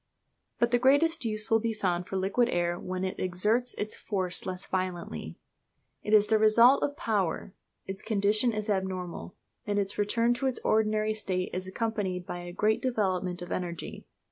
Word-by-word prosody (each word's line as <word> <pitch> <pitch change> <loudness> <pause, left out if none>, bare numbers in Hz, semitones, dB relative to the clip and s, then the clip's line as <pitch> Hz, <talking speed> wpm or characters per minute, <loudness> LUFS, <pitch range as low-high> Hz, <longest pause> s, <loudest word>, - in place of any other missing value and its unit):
But 235 0 +2
the 245 - +3
greatest 285 +3 +3
use 215 0 0
will 225 - +5
be 225 0 -2
found 180 -3 -1
for 195 - -3
liquid 200 +6 +1
air 175 -2 0
when 185 0 -4
it 185 - -3
exerts 210 +7 +1
its 210 +1 -3
force 185 -4 -3
less 185 0 -4
violently. 175 - -4 0.6
It 210 - -4
is 210 -1 +6
the 215 +1 +2
result 230 +5 +6
of 285 0 -1
power; 195 -4 -1 0.3
its 190 0 -6
condition 215 +2 +2
is 215 -1 -3
abnormal; 185 -3 -3 0.3
and 205 0 0
its 200 0 -1
return 230 +3 +2
to 265 +2 -1
its 260 - 0
ordinary 215 0 +2
state 185 -4 -3
is 185 +1 -4
accompanied 190 -3 -2
by 175 - -5
a 175 0 -7
great 215 +4 +1
development 185 -7 -1
of 175 - -9
energy. 175 -2 -5
205 Hz, 175 wpm, -29 LUFS, 185-225 Hz, 0.6 s, is